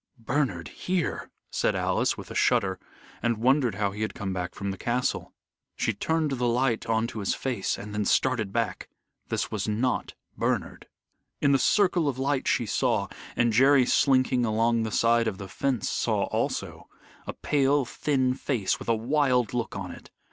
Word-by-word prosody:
"Bernard 115 - -1
here," 180 -3 -2 0.2
said - - +1
Alice, - - +1
with - - -9
a - - -5
shudder, 95 -1 +2 0.4
and 115 -1 +1
wondered 125 -1 +2
how 100 -1 0
he 105 +2 -7
had 110 - -2
come 100 -2 -3 0.2
from 100 -1 -4
the 95 - -6
castle. 125 +1 -1 0.4
She - - 0
turned 160 -2 0
the 125 -2 0
light 120 -1 +1
on 110 0 +1
to 115 - -5
his 100 - 0
face, 120 -8 -2
and 105 +1 -8
then 105 -1 -1
started 115 -3 +1
back. 115 +1 -2 0.4
This - - -2
was 105 -1 -2
not 115 +4 -1 0.2
Bernard. - - -2 0.5
In 140 - +3
the 135 - +4
circle 180 -2 +3
of 130 - -4
light 135 0 0
she 120 - +2
saw 105 - 0 0.3
and 120 -2 +2
Jerry 135 +2 +5
slinking 130 -2 +3
along 115 +1 +2
the 110 -1 -2
side 115 +1 +3
of 105 -4 -2
the 100 -1 -7
fence 130 +2 -1
saw - - 0
also - - -3 0.4
a - - -3
pale, 140 -1 +1
thin 130 0 0
face 130 -6 -1
with - - -7
a 115 - +4
wild 125 -1 +1
look 120 -2 -2
on - - -5
it. - - -12
120 Hz, 175 wpm, -27 LUFS, 110-135 Hz, 0.5 s, Jerry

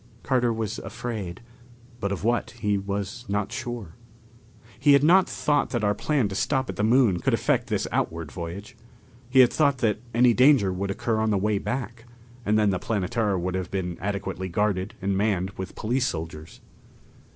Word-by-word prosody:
Carter 125 -3 +2
was 110 -1 -3
afraid, 105 -7 -5 0.6
but 100 -2 -2
of 100 -2 -3
what, 120 +1 0
he 105 -2 +1
was 100 +3 -4
not 105 +1 -1
sure. 120 -8 -5 0.9
He 145 - +5
had 140 0 +5
not 180 +4 +5
thought 145 -1 +1
that 120 -4 -2
our 105 0 +3
plan 140 -1 0
to - - -5
stop 130 +6 0
at - - -11
the 105 - -1
Moon 115 -5 +4
could - - +1
affect - - 0
this - - -1
outward 80 -2 -2
voyage. 95 +7 -7 0.5
He 130 0 +6
had 125 - +4
thought 140 -3 +3
that 110 -4 +1
any 120 +1 +4
danger 125 -7 +5
would 100 +2 -3
occur 115 +3 -1
on 110 0 +1
the 105 - +2
way 105 +1 +1
back, 120 -1 -4 0.4
and 105 +1 +3
then 105 -2 +3
the 95 - -1
Planetara 105 0 -1
would 90 +1 -2
have 95 -2 -3
been 90 -3 -3
adequately 100 -2 -3
guarded 100 +1 -1
and 100 0 +1
manned 95 -2 0
with 95 -2 -7
police 125 +3 0
soldiers. 80 -3 -6
105 Hz, 185 wpm, -25 LUFS, 95-120 Hz, 0.9 s, He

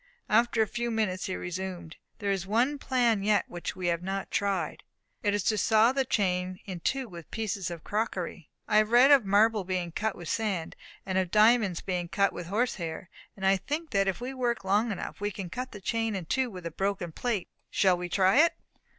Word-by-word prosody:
After 230 +1 +4
a - - -3
few 240 +2 -3
minutes 215 -5 -1
he 185 - -2
resumed: 175 -2 -5 0.2
"There 200 -2 -1
is 190 -1 -2
one 250 +8 +1
plan 240 -6 +2
yet 205 +1 +2
which 175 -1 -5
we 185 - -5
have 170 0 0
not 195 +2 -4
tried; 195 -6 -1 0.4
it 205 0 +1
is 205 - -1
to 215 +1 +1
saw 220 +3 +4
the 270 0 0
chain 185 -4 0
in 185 -3 -6
two 265 +9 -1
with 170 -5 -11
pieces 205 -4 -3
of 170 -2 -7
crockery. 185 -6 -3 0.2
I 210 - +3
have 215 0 +4
read 245 +4 +6
of 275 -6 +6
marble 210 +1 +3
being 180 -2 -2
cut 220 +5 -2
with 175 - -9
sand, 195 -6 -2 0.3
and 190 -1 0
of 185 -2 -1
diamonds 215 -3 +4
being 180 -2 -2
cut 200 +3 +1
with 175 - -6
horse 225 +7 0
hair. 170 +1 -6 0.3
And 190 - -3
I 195 0 +5
think 305 - -4
that 195 -1 +2
if 195 - -1
we 250 +2 -5
work 245 -4 -1
long 205 +4 +2
enough 200 - -6
we 205 - 0
can 190 -3 -7
cut 255 +3 -5
the 205 - -9
chain 225 +2 -1
in 185 -3 -4
two 260 +9 0
with 180 -5 -9
a 170 - -3
broken 195 -1 -2
plate. 215 0 -2 0.2
Shall 190 -2 +3
we 175 0 -5
try 190 +4 +3
it?" 330 +3 +5
200 Hz, 220 wpm, -28 LUFS, 185-225 Hz, 0.4 s, read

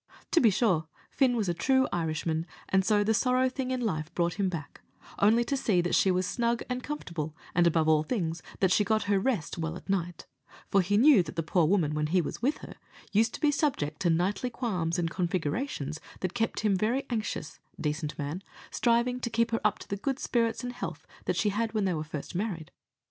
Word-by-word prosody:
To 335 - +5
be 230 - +6
sure, 185 -6 +1 0.2
Fin 260 -3 +3
was 215 -4 0
a 175 - +1
true 260 +8 +2
Irishman, 160 0 -1 0.2
and 190 0 +3
so 205 +1 +3
the 220 +2 +2
sorrow 255 +3 +3
thing 260 0 -4
in 255 -1 -1
life 160 -8 -2
brought 170 +2 0
him 195 -2 +2
back, 160 -5 -7 0.4
only 225 +4 +5
to 275 - -1
see 210 -8 +2
that 175 0 0
she 195 - +4
was 185 0 +2
snug 235 +3 0
and 250 0 -1
comfortable, 170 - -5 0.2
and, 175 0 +4
above 160 -1 +2
all 155 -1 +5
things, 165 -2 -2 0.2
that 190 -2 +4
she 210 - +4
got 215 +1 +1
her 200 -1 +2
rest 200 - -1
well 165 0 -2
at - - -14
night; 175 -3 -2 0.5
for 195 - +5
he 205 +3 +1
knew 260 -2 +7
that 160 -3 -7
the 165 - -1
poor 165 0 +2
woman, 165 -5 +2
when 150 0 0
he 180 +4 +2
was 170 - -3
with 275 +5 +1
her, - - -11 0.3
used 225 +3 +2
to - - -8
be 300 - +4
subject 230 - -1
to 175 - +1
nightly 185 +9 +1
qualms 185 -9 -2
and 170 -2 -1
configurations, 170 - -2 0.2
that 185 -1 -2
kept 225 -2 -1
him 210 -2 +2
very 235 +8 0
anxious, 215 -9 -3 0.2
decent 150 0 -2
man, 150 +6 -4 0.3
striving 240 +1 +2
to 245 - -3
keep 230 0 +1
her 225 - 0
up - - +2
to - - -12
the 200 - -3
good 270 +6 -2
spirits 230 -3 0
and 245 0 -4
health 245 - -6 0.2
that - - 0
she 210 - +2
had 220 +2 -1
when 210 -2 +1
they 185 - +1
were 155 -2 -2
first 150 -2 -7
married. 180 -4 -3
195 Hz, 225 wpm, -29 LUFS, 165-235 Hz, 0.5 s, knew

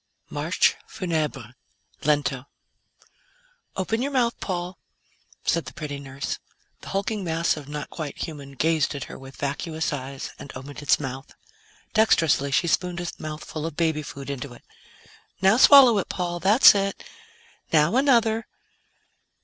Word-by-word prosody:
MARCHE - - +2
FUNEBRE 150 - -3 0.5
LENTO 145 -3 +1 1.3
"Open 220 +5 -1
your 280 +2 -1
mouth, 240 -3 +2
Paul," 180 -1 -4 0.7
said 170 - +1
the - - -10
pretty 145 -2 -5
nurse. 140 0 -5 0.4
The - - -11
hulking 200 +1 -2
mass 165 -1 +1
of 145 -2 -9
not 150 0 -6
quite 155 -3 -6
human 140 -4 -7
gazed 155 +1 +1
at 140 - -4
her - - -10
with 135 0 -12
vacuous 155 +3 -3
eyes 135 -1 -6
and 140 - -9
opened 140 +3 -8
its 145 - +3
mouth. 135 -1 -7 0.6
Dexterously, 165 -10 +3
she 140 - +2
spooned 175 +1 0
a 175 - -4
mouthful 155 0 -6
of 165 - -7
baby 160 -2 +1
food 140 -1 -7
into 135 -1 -6
it. - - -18 0.8
"Now 190 +4 +4
swallow 265 -3 +8
it, - - -4
Paul. 175 -2 -3
That's 205 - +7
it. 195 -1 -2 0.7
Now 155 +6 +4
another." 235 -4 +3
160 Hz, 140 wpm, -25 LUFS, 140-190 Hz, 1.3 s, swallow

